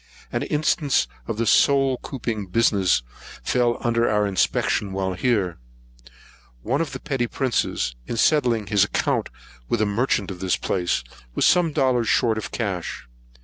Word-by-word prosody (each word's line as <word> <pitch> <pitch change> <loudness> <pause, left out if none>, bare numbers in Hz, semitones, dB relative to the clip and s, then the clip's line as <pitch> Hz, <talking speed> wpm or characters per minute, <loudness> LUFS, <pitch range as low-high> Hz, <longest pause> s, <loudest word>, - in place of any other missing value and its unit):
An - - -1
instance 150 -1 +1 0.2
of 115 - -3
this 115 -1 +2
soul 135 -3 +3
couping 110 -7 -5
business 95 - +3 0.4
fell 120 - +1
under 115 0 +1
our 105 -1 +2
inspection 100 0 0
while 95 -1 -1
here. 95 - 0 1.0
One 135 +7 0
of 165 - -3
the - - -5
petty 135 -5 -2
princes, 120 - -1
in 115 - -3
settling 120 -5 +2
his 100 -1 +3
account 105 - 0 0.4
with - - +1
a 110 - +2
merchant 105 -1 0
of 90 - -8
this 95 -1 0
place, 90 -9 -1 0.3
was - - +2
some 175 -3 +4
dollars 125 -5 +1
short 110 -2 +2
of 100 -2 -6
cash. 100 -7 -4
115 Hz, 150 wpm, -23 LUFS, 100-130 Hz, 1.0 s, some